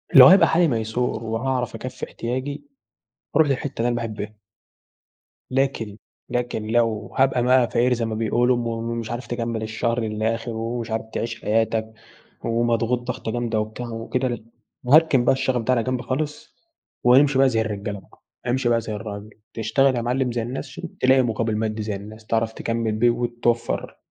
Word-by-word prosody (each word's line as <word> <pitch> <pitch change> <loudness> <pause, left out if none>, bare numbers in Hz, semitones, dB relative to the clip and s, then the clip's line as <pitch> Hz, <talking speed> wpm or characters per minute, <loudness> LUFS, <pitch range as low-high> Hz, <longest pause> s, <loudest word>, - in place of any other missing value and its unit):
لو - - +12
هيبقى 190 +2 +7
حالي 170 +1 +3
ميسور، 115 -1 -1
وهاعرف 120 +2 -2
أكفِّي 130 +3 -6
احتياجي 130 +4 -4 0.7
هاروح 160 -2 +5
للحتة 135 -1 -2
اللي 120 - +2
أنا 120 - 0
باحبها. 110 -2 -5 1.2
لكن 130 -6 -1 0.3
لكن 120 -3 -2
لو 110 -3 0
هابقى 130 -2 +3
بقى 125 -1 +4
فقير 125 +1 +2
زي 115 -1 -1
ما 110 - -3
بيقولوا، 120 +3 +2
ومش 115 -1 -3
عارف 120 0 -5
تكمل 115 -2 -2
الشهر 115 +2 -1
للآخر، 110 +2 -2
ومش 115 0 -4
عارف 110 0 -2
تعيش 115 0 -3
حياتَك، 110 0 0 0.5
ومضغوط 120 +1 +1
ضغطة 120 -2 -4
جامدة 120 -2 -1
وبتاع 110 +3 -4
وكده، 120 +3 -2
ل 120 -3 -4 0.4
هاركن 145 -3 +5
بقى - - +5
الشغف 130 -2 0
ده 130 +3 +2
على 115 - +1
جنب 130 0 -1
خالص، 150 +3 -4 0.5
وامشي 135 +3 +5
بقى 135 -1 +6
زي 115 -2 +1
الرجالة 100 -2 -4
بقى. - - -22 0.3
امشي 125 0 +1
بقى 115 -1 +3
زي 110 - -5
الراجل 105 0 -6 0.2
تشتغل 130 +4 +2
يا 120 - 0
معلم 125 +1 0
زي 115 -1 -1
الناس 125 +5 -4
ش 135 - -11
عشان 175 -2 -8
تلاقي 130 +1 +5
مقابل 115 -2 -1
مادي 110 0 -2
زي 105 -1 -3
الناس، 105 +2 -10
تعرف 115 0 0
تكمِّل 115 -1 -1
بيه 110 +3 +3
وتوفَّر 120 0 -1
120 Hz, 170 wpm, -23 LUFS, 110-125 Hz, 1.2 s, لو